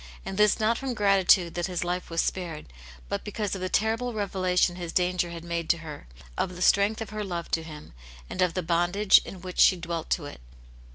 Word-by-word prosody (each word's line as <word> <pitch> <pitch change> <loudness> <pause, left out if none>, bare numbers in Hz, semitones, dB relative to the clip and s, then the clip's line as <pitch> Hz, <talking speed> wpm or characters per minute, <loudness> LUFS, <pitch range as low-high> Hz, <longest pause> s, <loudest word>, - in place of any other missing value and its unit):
And 195 - -5
this 210 0 +3
not 220 +2 +1
from 265 -3 -3
gratitude 195 -4 +4
that 175 0 -2
his 180 -2 -2
life 180 +1 -3
was 165 0 +1
spared, 170 -5 -4 0.4
but - - -3
because 210 -1 -3
of 190 - -4
the 185 - -2
terrible 225 +5 0
revelation 185 -3 +1
his 175 -2 -6
danger 180 0 +1
had 170 -1 -8
made 170 -1 -4
to 170 - +4
her, 150 - -9 0.3
of 180 - -2
the 180 - -9
strength 205 +3 +3
of 225 - -6
her 215 0 -4
love 175 -4 -5
to 165 - +1
him, 150 - -11 0.3
and - - -4
of 180 -2 +2
the 185 - -1
bondage 175 +5 +4
in 185 - -9
which 185 0 -7
she 185 - +7
dwelt 170 -1 -5
to 160 - 0
it. 145 - -10
180 Hz, 220 wpm, -27 LUFS, 170-200 Hz, 0.4 s, she